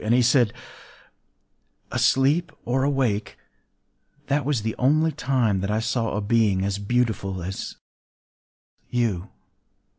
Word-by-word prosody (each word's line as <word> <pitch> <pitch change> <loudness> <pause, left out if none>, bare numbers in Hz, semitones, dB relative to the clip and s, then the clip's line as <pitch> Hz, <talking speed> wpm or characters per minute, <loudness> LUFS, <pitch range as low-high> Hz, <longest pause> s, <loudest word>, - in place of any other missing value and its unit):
And 110 +2 +3
he 125 - +4
said:— 120 -2 +4 1.4
“Asleep 135 +7 +2
or 125 +3 +1
awake, 130 -7 0 0.9
that 145 0 +1
was 135 -7 0
the 110 0 -1
only 155 +5 +3
time 125 -8 0
that 100 - -2
I 105 +1 +1
saw 115 -1 -1
a - - -1
being 100 -3 +2
as 100 0 -2
beautiful 100 -4 -1
as 95 +2 -5 1.1
you. 110 -6 -1
115 Hz, 120 wpm, -24 LUFS, 105-130 Hz, 1.4 s, he